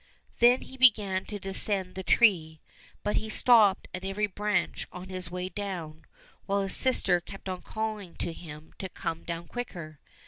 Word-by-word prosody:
" - - -35
Then 245 +2 +5
he 265 - -13
began 205 -7 +3
to 210 - -6
descend 195 -1 +1
the 190 - -5
tree, 170 -7 +3 0.4
but 210 - 0
he 220 - -2
stopped 215 -3 +5
at 185 - -6
every 195 +2 -1
branch 205 -2 -2
on 180 +1 -9
his 185 -2 -1
way 180 +1 -4
down, 180 -6 -6 0.4
while 200 0 +1
his 195 - +1
sister 195 -9 +4
kept 195 +3 -11
on 185 -1 -4
calling 215 -5 -5
to 170 - -3
him 155 -2 -12
to 190 - -5
come 165 -2 -5
down 170 0 -6
quicker. 170 - -7
190 Hz, 175 wpm, -28 LUFS, 175-210 Hz, 0.4 s, Then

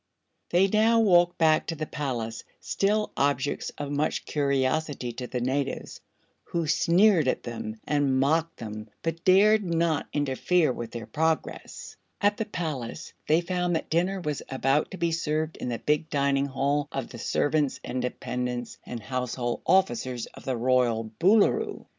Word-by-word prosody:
They 180 +3 +4
now 220 +3 +4
walked 175 -5 +4
back 160 -1 +3
to 165 - -2
the 155 0 -3
palace, 120 -7 -4 0.2
still 210 +2 0
objects 140 0 0
of 145 -1 -4
much 145 +2 -1
curiosity 140 -1 0
to 125 +1 -6
the 125 -1 -3
natives, 135 +2 -2 0.4
who 170 -1 -2
sneered 170 +1 +4
at - - 0
them 110 -2 -6
and 140 -3 +1
mocked 160 +4 +1
them 110 -1 -7
but 165 0 -3
dared 210 +3 +5
not 170 -3 0
interfere 145 +2 +1
with 120 -2 -6
their 115 -1 -7
progress. 160 +5 -2 0.2
At 205 0 +2
the 220 - -2
palace 155 - -5
they 160 +3 +4
found 180 0 -1
that 160 - -3
dinner 180 +4 +1
was 150 -5 -3
about 135 +2 +1
to 190 - -8
be 170 -1 0
served 155 -1 -1
in - - -4
the 120 - -2
big 150 +4 0
dining 140 -1 +1
hall 140 +2 0
of 135 -3 -4
the 120 - -9
servants 145 +3 0
and 125 - -3
dependents 125 -1 -4
and 120 -2 -7
household 125 -1 -3
officers 130 -9 +2
of - - -14
the 130 -2 -1
royal 120 -2 +1
Boolooroo. 225 - +3
145 Hz, 160 wpm, -27 LUFS, 130-170 Hz, 0.4 s, dared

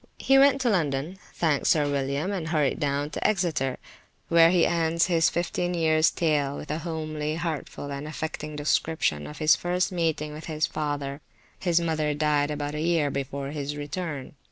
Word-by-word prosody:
He 270 0 +4
went 275 0 +5
to 250 - +2
London, 160 0 -1 0.2
thanked 155 -5 +1
Sir 150 -2 +3
William, 140 +5 -1
and 180 -5 -3
hurried 155 -4 +1
down 145 +1 -1
to - - 0
Exeter, 165 -10 0 0.5
where 165 0 +7
he 175 -1 +4
ends 165 -1 +2
his 165 -3 +3
fifteen 175 +1 -1
years 160 -1 +3
tale 145 -4 0
with 150 - -6
a 155 - -2
homely, 155 -2 -3
heartful 160 -3 -4
and 140 +2 -5
affecting 155 -1 -5
description 145 - 0
of 150 - -9
his 155 -1 +5
first 180 +4 -1
meeting 160 -4 -1
with 155 +1 -8
his 155 -1 0
father. 145 -1 -3 0.4
His 175 -2 +2
mother 155 -3 0
died 150 -1 +1
about 145 -1 -3
a 150 - -3
year 160 -3 +1
before 140 0 -4
his 145 -1 -4
return. 145 -2 -5
155 Hz, 175 wpm, -26 LUFS, 145-170 Hz, 0.5 s, where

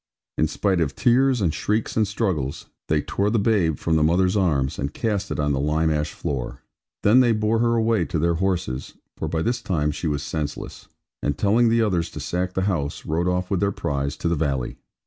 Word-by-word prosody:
In 80 - +2
spite 95 +3 0
of 75 -4 -1
tears, 130 0 +3
and 85 -5 +1
shrieks, 105 +4 -1
and 110 -2 +2
struggles, 90 - -2 0.2
they 75 -1 +1
tore 100 +1 0
the 115 - +1
babe 100 - +2
from 80 -1 +1
the - - +2
mother's 90 +4 +3
arms, 75 -9 +1
and 70 - -2
cast 105 +2 -2
it - - -3
on 75 0 +1
the 65 - 0
lime 80 +3 +1
ash 75 -1 -1
floor; 65 -4 -4 0.4
then 110 +5 +6
they 120 -3 +4
bore 110 +1 +1
her 115 0 +2
away 110 -5 +2
to 80 - -2
their 85 +2 +2
horses 85 -9 -2 0.2
(for - - -4
by 80 -1 -1
this 120 +1 -1
time 75 -5 0
she 80 +3 -4
was 75 -1 -1
senseless), 75 -1 -5 0.3
and 70 -1 -1
telling 115 +4 +3
the 115 0 +3
others 90 -6 0
to - - -8
sack 90 +1 -2
the 95 - +1
house, 85 -8 -2
rode 85 +3 0
off 90 +1 -1
with 95 - +1
their 100 0 +1
prize 70 -5 -2
to - - -2
the 85 - +2
valley. 70 -6 -2
90 Hz, 220 wpm, -23 LUFS, 75-105 Hz, 0.4 s, then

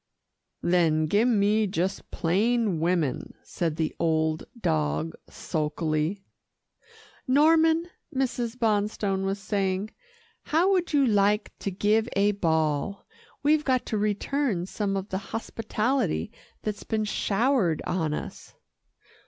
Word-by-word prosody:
"Then 165 -3 +3
give 205 +9 +3
me 215 -1 +3
just 190 0 -2
plain 205 +2 +1
women," 165 -5 -1
said 165 -4 -2
the 160 -1 -1
old 160 -1 +1
dog 75 - 0 0.2
sulkily. 155 +4 -2 1.0
"Norman," 320 +4 +4 0.2
Mrs. 250 -3 -2
Bonstone 205 -3 0
was 195 +1 -1
saying, 195 0 -1 0.5
"how 340 +5 +2
would 365 -3 +1
you 285 -3 +4
like 210 -1 +2
to - - -2
give 210 +4 +1
a 200 +1 +4
ball. 160 0 0 0.4
We've 300 +1 +3
got 260 -3 +1
to 215 - -2
return 210 -1 0
some 195 0 -2
of 195 +2 -5
the 190 - -2
hospitality 225 - -2 0.3
that's 210 -1 -4
been 215 -1 -1
showered 210 - +1
on 165 -4 -1
us." - - -8
200 Hz, 115 wpm, -26 LUFS, 170-230 Hz, 1.0 s, Norman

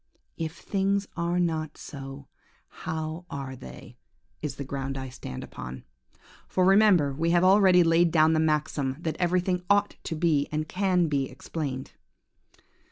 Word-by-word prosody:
If 165 0 -4
things 200 0 0
are 170 +1 0
not 160 -3 -1
so, 135 -1 -9 0.4
how 160 +2 -5
are 135 -2 -5
they? 125 -1 -12 0.4
is 150 -3 -3
the 140 - -5
ground 135 0 -4
I 130 -1 -5
stand 125 - -7
upon. 65 0 -8 0.6
For 185 - +1
remember 190 -7 +5
we 165 +4 0
have 175 +1 +4
already 185 -2 +6
laid 165 +1 +4
down 160 -1 +4
the 160 - +2
maxim, 150 -3 0
that 160 -2 -3
everything 180 0 +1
ought 205 0 +3
to 165 - -3
be 155 -3 +2
and 155 0 -2
can 180 -2 +1
be 140 -3 0
explained. 135 0 -5
160 Hz, 150 wpm, -27 LUFS, 140-180 Hz, 0.6 s, already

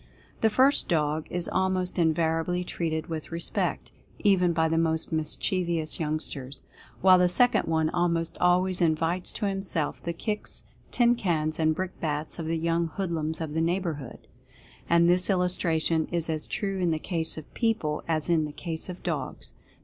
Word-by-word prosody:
The 220 - +4
first 260 +6 +4
dog 155 -2 0
is 175 -1 -2
almost 185 -1 0
invariably 165 +2 +1
treated 160 -3 -3
with 160 -1 -6
respect, 165 0 -1 0.3
even 185 -4 +3
by 160 -1 +2
the 165 0 +1
most 160 -1 0
mischievous 165 +1 -1
young 155 -1 0
sters; 135 -3 -5 0.4
while 185 -1 +7
the 180 0 +4
second 245 +7 +3
one 160 -1 +1
almost 170 -1 0
always 180 +1 +3
invites 165 +2 +2
to 215 - -3
himself 195 -6 -2
the 170 - -3
kicks, 210 +5 -4 0.3
tin 240 -1 +4
cans 160 -9 -1
and 160 0 +2
brick 185 +1 -4
bats 155 +1 -2
of 160 - -4
the 165 0 0
young 165 +1 0
hoodlums 160 -3 -3
of 155 -2 -4
the 160 - 0
neighborhood. 165 -6 -3 0.6
And 170 0 +5
this 180 +2 +3
illustration 170 -4 +1
is 170 -1 0
as 155 -1 0
true 195 -2 -2
in 180 -2 +1
the 160 - +1
case 165 0 -2
of 155 - -10
people 220 -11 -1
as 155 -2 0
in 165 -3 +2
the 150 - -6
case 165 +1 -5
of 180 - -8
dogs. 150 -7 -4
170 Hz, 170 wpm, -27 LUFS, 160-180 Hz, 0.6 s, while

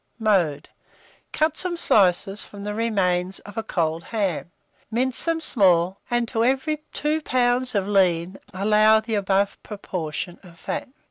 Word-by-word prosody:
Mode. 180 -10 +1 0.6
Cut 310 0 +1
some 355 -1 0
slices 195 - +3
from 200 -1 -10
the 210 0 -3
remains 190 -5 0
of 205 - -12
a 225 - -1
cold 165 -6 -2
ham, 195 -7 -2 0.4
mince 250 +3 0
them 330 -1 0
small, 190 - +2
and 240 -1 0
to 225 - 0
every 270 +5 0
2 305 +1 -1
lbs. 250 -2 +1
of 200 -1 0
lean, 185 -2 +1
allow 215 +3 +4
the 220 +1 -5
above 200 -1 0
proportion 175 -5 -5
of 170 -2 -16
fat. - - -4
205 Hz, 145 wpm, -23 LUFS, 185-240 Hz, 0.6 s, allow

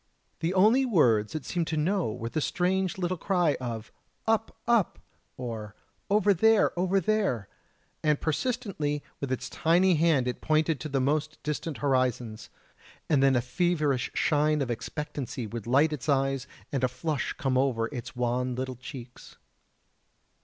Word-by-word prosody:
The 170 +3 -1
only 220 +8 +5
words 125 - +3
it 150 -5 -4
seemed 170 +1 -1
to 160 - -2
know 175 - +1
were 115 +2 -5
the 155 - -2
strange 185 +3 0
little 180 0 -1
cry 175 -6 +2
of: 115 -3 -5 0.3
"Up, 225 0 0
up," 235 -5 +3 0.4
or 110 -4 -6 0.3
"Over 205 0 +4
there, 220 +4 +4
over 185 +2 +2
there," 190 - 0 0.5
and 150 -1 +2
persistently 160 - -1 0.2
with 140 -2 -4
its 130 - -2
tiny 180 +3 +3
hand 155 -5 +3
it 125 - -3
pointed 155 -1 +2
to 155 - -5
the 135 -1 0
most 150 +3 0
distant 150 0 -3
horizons; 125 -5 0 0.6
and 145 -3 +4
then 135 -1 +5
a 120 - +3
feverish 150 -2 0
shine 150 -1 +2
of 125 - -3
expectancy 135 0 -4
would 115 0 -6
light 145 +5 +4
its 150 0 -5
eyes 135 -1 +1 0.2
and 135 -2 -1
a - - +5
flush 135 +4 -2
come 135 -2 -1
over 130 -3 +2
its 125 -3 -7
wan 125 +1 0
little 130 0 -4
cheeks. 125 -1 -10
150 Hz, 155 wpm, -28 LUFS, 125-175 Hz, 0.6 s, only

